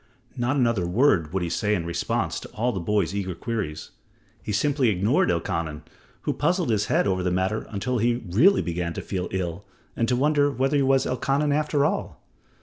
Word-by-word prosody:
Not 125 +3 0
another 115 -9 +1
word 90 - +2
would 95 -1 -1
he 85 - -2
say 105 +3 +1
in 85 -4 -3
response 85 0 -1
to - - -10
all 120 +3 0
the 95 - -3
boy's 100 -1 0
eager 95 -3 -3
queries. 100 -7 -4 0.5
He - - -5
simply 135 +3 +2
ignored 105 +7 +2
Elkanan 85 -3 -2 0.4
who - - -1
puzzled 170 -3 0
his 105 -1 +1
head - - +2
over 95 -2 0
the 90 - 0
matter 95 +4 -1
until 120 +4 -2
he 120 +2 +1
really 140 - +4
began 85 0 -3
to - - -5
feel 90 -2 -3
ill 90 0 -3 0.3
and 115 - 0
to 125 - +2
wonder 145 +2 +3
whether 135 +2 0
he - - +3
was 135 0 +3
Elkanan 140 +3 0
after 150 -1 +1
all. - - -2
110 Hz, 195 wpm, -25 LUFS, 90-135 Hz, 0.5 s, really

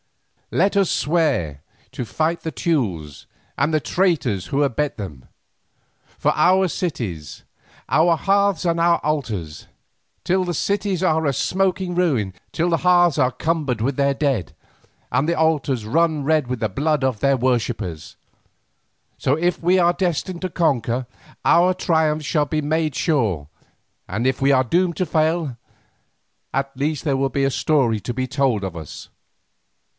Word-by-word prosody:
Let 195 - +1
us 195 -3 +3
swear 140 - 0 0.3
to - - -4
fight 160 +8 -1
the 160 - -4
Teules 95 - -2 0.3
and 155 - +1
the 155 - +3
traitors 150 - 0
who 140 +1 +1
abet 145 +2 -1
them, 75 - -8 0.9
for - - +2
our 185 +4 +4
cities, 115 - -4 0.4
our 165 +1 +3
hearths 200 -1 +1
and 170 -1 +1
our 170 0 +4
altars; 110 - -3 0.6
till 185 +1 +2
the 175 -2 -3
cities 200 0 -1
are 160 -3 +2
a 140 - +2
smoking 185 +4 0
ruin, 135 - +1 0.2
till 170 +2 0
the 165 - +2
hearths 175 -3 +3
are 130 -2 +3
cumbered 150 -6 -1
with 130 +5 -1
their 140 0 +1
dead, 135 - -1 0.6
and 135 +6 +1
the 170 - +1
altars 150 -7 +1
run 155 +4 +1
red 155 -3 +2
with 125 -1 -3
the 110 - 0
blood 145 +7 0
of 130 -5 0
their 140 +2 +2
worshippers. 115 -10 -2 1.0
So, 135 - +1
if 175 +2 -1
we 180 +2 +3
are 175 -1 +4
destined 175 0 -2
to 185 - -2
conquer, 130 -7 0 0.4
our 180 +2 +5
triumph 160 -4 +1
shall 150 -1 +1
be 155 +1 -1
made 155 0 -1
sure, 110 - 0 0.6
and 110 +6 -2
if 130 +1 0
we 135 +1 +4
are 130 -1 +4
doomed 170 +6 0
to 185 - 0
fail, 155 -4 0 1.0
at 135 0 -2
least 145 +2 -2
there 140 -3 +1
will 135 0 0
be 135 +2 -1
a 135 - +1
story 130 -8 +1
to 120 - -4
be 130 +1 -2
told 130 -7 0
of 95 -3 -5
us. 80 -3 -9
150 Hz, 160 wpm, -21 LUFS, 125-170 Hz, 1.0 s, our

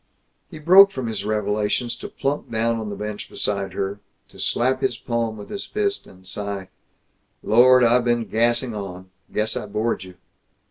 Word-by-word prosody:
He 165 - -9
broke 185 +6 +7
from 130 -7 -4
his 110 -3 -3
revelations 105 +2 0
to - - -8
plump 140 +2 -3
down 115 0 0
on 110 -1 -4
the 100 - -5
bench 105 0 -6
beside 100 -2 -2
her, 100 +1 -3 0.3
to - - -16
slap 130 +2 +1
his 120 - 0
palm 115 -2 -2
with 105 - -10
his 200 - -5
fist, 410 -1 -2
and 95 0 -17
sigh, 100 0 -5 0.7
"Lord, 125 +3 +6
I've 120 +1 +4
been 120 -1 +1
gassing 120 +2 +1
on! 95 -3 -7 0.2
Guess 110 +1 0
I 105 - -4
bored 105 0 -1
you!" 90 -1 -12
110 Hz, 175 wpm, -23 LUFS, 105-125 Hz, 0.7 s, broke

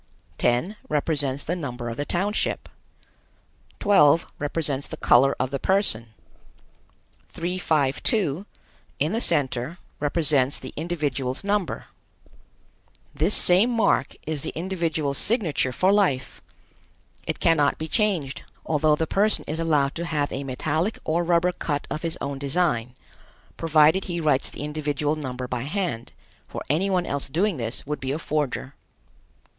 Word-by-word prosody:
10 125 - +1
represents 145 -2 0
the 175 - -2
number 125 -8 -5
of 115 - -4
the 145 - -3
township. 195 +7 -1 1.1
12 165 -6 +5
represents 145 -2 -1
the - - -7
color 135 +3 +4
of 130 +1 -1
the 140 - -2
person. 190 - +3 1.2
352, 170 - 0 0.5
in 150 +4 0
the 230 - 0
center, 130 - +2 0.2
represents 145 -3 +2
the - - -9
individual's 145 -5 -2
number. 200 -2 -1 1.3
This - - +3
same 185 +7 +6
mark 225 - +1
is 155 -2 -2
the - - -2
individual's 165 -5 -1
signature 185 - +1
for 185 +9 +2
life. 145 -11 0 0.9
It - - -2
cannot 150 -4 +3
be 160 - -5
changed, 165 -7 0 0.2
although 155 -1 +2
the 160 - -1
person 205 +6 +1
is 155 +2 -3
allowed 150 -4 +1
to 170 - -4
have 150 -3 -1
a 140 - -4
metallic 155 - -1
or 170 +2 0
rubber 175 +1 +2
cut 145 -4 -3
of 155 - -3
his 165 -1 0
own 140 -1 -4
design, 140 -5 0 0.6
provided 160 +3 +3
he 175 -2 -3
writes 150 -4 +2
the - - -7
individual 150 0 -1
number 130 -4 -5
by 125 -1 -3
hand, 145 - -3 0.4
for - - -6
any 180 +7 +1
one 180 -2 +1
else 140 0 -2
doing 180 +4 0
this 115 -1 -2
would 150 0 -3
be 135 0 -3
a 145 - -1
forger. 145 -4 -2
150 Hz, 140 wpm, -24 LUFS, 140-175 Hz, 1.3 s, same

